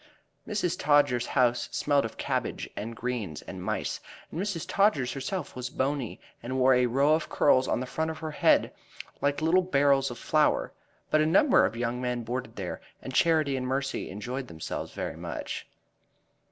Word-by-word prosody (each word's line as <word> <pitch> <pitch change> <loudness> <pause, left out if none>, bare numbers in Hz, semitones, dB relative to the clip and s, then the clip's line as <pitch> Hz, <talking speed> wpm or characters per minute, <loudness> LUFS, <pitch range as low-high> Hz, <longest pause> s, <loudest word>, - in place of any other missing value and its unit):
Mrs. 205 -5 -1
Todgers's 145 -4 +3
house 125 -2 +2
smelled 145 -3 +2
of 115 - -7
cabbage - - -2
and 115 +3 -5
greens 115 -10 -4
and - - -8
mice, - - -2 0.3
and 165 - -3
Mrs. 195 -6 -2
Todgers 175 -12 +2
herself 145 +5 -4
was 125 -1 -4
bony 135 -3 -2 0.2
and 130 +3 -3
wore 130 0 +5
a 125 0 +4
row 140 +5 +3
of 160 +1 0
curls 130 -2 +4
on - - +1
the 130 - -3
front 160 +5 -2
of 160 - -5
her 160 -1 -5
head - - +3 0.5
like 145 +2 0
little 175 +4 +4
barrels 140 -5 +3
of 120 - -7
flour. - - +1 0.4
But 155 - +4
a 155 - +3
number 250 - +5
of 115 - -7
young 120 +1 -2
men 125 -1 -2
boarded 120 0 -4
there, 95 -3 -5 0.2
and 130 - -8
Charity 155 -2 +3
and 130 -1 -2
Mercy 135 +1 -2
enjoyed 125 +7 -5
themselves 80 -5 -5
very - - -4
much. - - -5
135 Hz, 180 wpm, -28 LUFS, 125-155 Hz, 0.5 s, wore